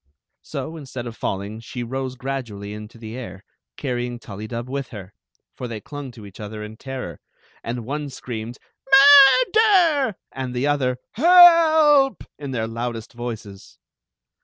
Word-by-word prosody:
So, 165 - -6
instead 130 -5 -7
of 115 -2 -7
falling, 100 +2 -4
^e 120 +1 -7
rose 130 +1 -4
gradually 120 -7 -6
into 105 +2 -10
the. 110 0 -9
air, 115 -6 -8 0.3
carrying 125 -3 -3
Tullydub 115 +2 -7
with 135 0 -4
her; 100 -3 -11 0.4
for 125 - -6
they 115 -2 -6
clung 145 +4 -8
to 110 -3 -12
each 100 -2 -14
other 105 0 -7
in 105 +1 -9
terror, 130 - -7 0.4
and 115 0 -5
one 145 +3 -4
screamed 120 -2 -7 1.0
"Murder!" 345 - +3 0.2
and 130 -1 -5
the 125 +3 -1
other 135 -4 0
" - - -67
Help!" 320 - +6 0.2
in 140 -2 -6
their 120 -4 -2
loudest 115 0 -5
voices. 110 -5 -8
125 Hz, 145 wpm, -22 LUFS, 110-140 Hz, 1.0 s, Help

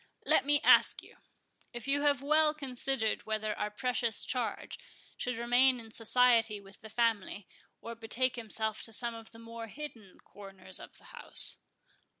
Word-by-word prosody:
Let - - +2
me 290 0 +6
ask - - +5
you, - - -17 0.6
if 240 +1 -8
you 285 +1 +1
have 285 -2 +1
well 305 +1 +4
considered 260 -6 -2
whether 215 -1 -2
our 210 - -3
precious 235 +1 0
charge 235 -5 -4 0.4
should 250 -2 -4
remain 245 +2 +4
in 225 -1 -12
society 230 -2 +3
with 195 0 -15
the 220 - -11
family, 215 -4 -1 0.3
or 235 - -7
betake 235 +3 -2
himself 220 -2 -4
to 225 - -4
some 235 +2 -2
of 225 -1 -11
the 225 - -15
more 230 0 -9
hidden 230 -7 -10
corners 195 -2 -9
of - - -12
the - - -18
house?" - - +2
230 Hz, 160 wpm, -31 LUFS, 220-255 Hz, 0.6 s, me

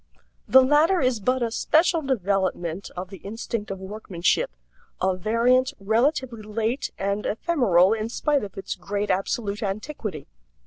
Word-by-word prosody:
The 265 0 +7
latter 305 +7 +4
is 255 -5 +1
but 255 +4 +1
a 230 - -1
special 325 +7 +2
development 195 - -1
of 185 +2 -5
the 195 - -8
instinct 220 +1 -5
of 195 - -4
workmanship, 190 -2 -1 0.5
a 185 0 +1
variant, 245 +7 +2
relatively 235 +3 0
late 220 +5 -2
and 200 +2 -1
ephemeral 215 - +3
in 220 0 -2
spite 290 +2 0
of 200 - -8
its 195 - -4
great 200 +2 -2
absolute 200 +2 -1
antiquity. 210 - -4
215 Hz, 140 wpm, -24 LUFS, 195-255 Hz, 0.5 s, The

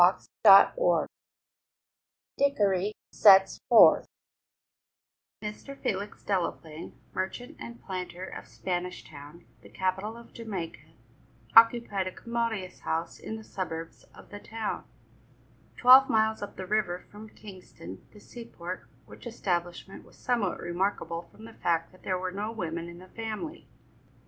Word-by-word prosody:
CHAPTER 195 -2 +9 0.3
IX - - -8 1.3
DICKORY 205 -7 +2 0.2
SETS 195 -2 +6
FORTH - - +7 1.4
Mr. 210 +6 -7
Felix 200 +1 -3
Delaplaine, 170 -4 -3 0.2
merchant 190 +6 -4
and 235 0 -9
planter 185 -1 -5
of - - -9
Spanish 180 0 -4
Town, 150 +3 -13 0.2
the - - -15
capital 190 +4 -2
of 235 - -15
Jamaica, 200 -8 -7 0.6
occupied 230 -4 +5
a - - -3
commodious 230 -4 -3
house 165 +1 -3
in 220 - -6
the 220 - -8
suburbs 165 -5 -6
of - - -15
the 205 - -7
town, 220 0 -5 0.9
twelve 260 +2 +8
miles 220 0 +2
up 205 - -6
the 185 - -6
river 185 -3 -1
from 215 +1 -11
Kingston, 185 - -12
the 210 - -15
seaport, 185 -6 -8 0.2
which - - -11
establishment 180 -4 -3
was - - -20
somewhat 235 -7 0
remarkable 175 -1 -2
from 220 - -14
the 230 - -12
fact 165 -4 -1
that 185 - -20
there 185 -1 -1
were 185 0 -3
no 205 +3 -4
women 170 -5 -4
in 170 - -11
the 185 +1 -14
family. 225 +9 -6
195 Hz, 130 wpm, -28 LUFS, 180-220 Hz, 1.4 s, CHAPTER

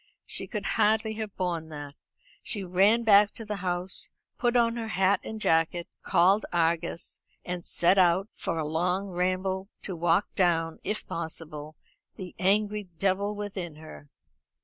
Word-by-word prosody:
She - - -1
could 210 -4 -4
hardly 220 0 +2
have 215 -3 -5
borne 170 -3 -2
that. 145 -2 -7 0.5
She 205 -4 -1
ran 195 +6 +3
back 205 -2 +6
to 225 - -7
the 210 -1 -3
house, 180 0 -1 0.3
put 240 -1 +1
on 230 -1 +3
her 230 -1 -4
hat 195 -2 +2
and 220 - -6
jacket, 165 -2 +1
called 190 +3 +4
Argus, 170 0 -1 0.3
and 180 -1 -4
set 180 +3 +3
out 185 +2 +4
for 165 - -3
along 175 +5 0
ramble, 185 +2 -1
to 190 - -4
walk 170 +3 +1
down, 165 -3 +1
if 210 +2 -3
possible, 155 -2 -6 0.4
the 185 -2 -8
angry 205 +1 +1
devil 200 +2 0
within 195 -6 -5
her. 155 -2 -12
185 Hz, 150 wpm, -28 LUFS, 170-205 Hz, 0.5 s, back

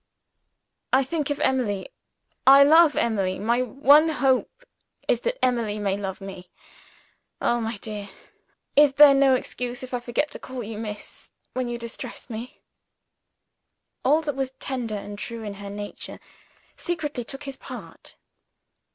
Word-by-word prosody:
"I 265 +1 +5
think 295 +2 -2
of 290 - -2
Emily 240 -7 0 0.6
I 275 +1 +10
love 315 +1 +6
Emily 195 -5 0
my 235 +4 +1
one 280 +6 +5
hope 285 - 0 0.4
is - - +2
that - - -1
Emily 230 -4 0
may 200 -2 0
love 195 -2 -5
me. 190 -2 -9 0.9
Oh, 240 0 +1
my 225 -1 -3
dear, 205 -1 -6 0.7
is 290 -1 +6
there 285 0 +9
no 275 -1 +5
excuse 250 0 -4
if 255 - -8
I 245 - 0
forget 250 +5 -1
to - - -7
call 255 -2 -6
you 215 0 -6
'Miss' 210 -2 -7 0.2
when 255 -1 -2
you 240 0 -3
distress 235 +1 -7
me?" 230 +3 -8 1.4
All 300 +5 +3
that 290 -3 -2
was 265 -1 -2
tender 245 -5 -3
and 205 0 -7
true 230 0 -6
in 205 -2 -5
her 200 - -6
nature 205 0 -7 0.6
secretly 295 -7 -3
took 270 +4 -8
his 275 -2 -7
part. - - -10
250 Hz, 150 wpm, -25 LUFS, 215-275 Hz, 1.4 s, I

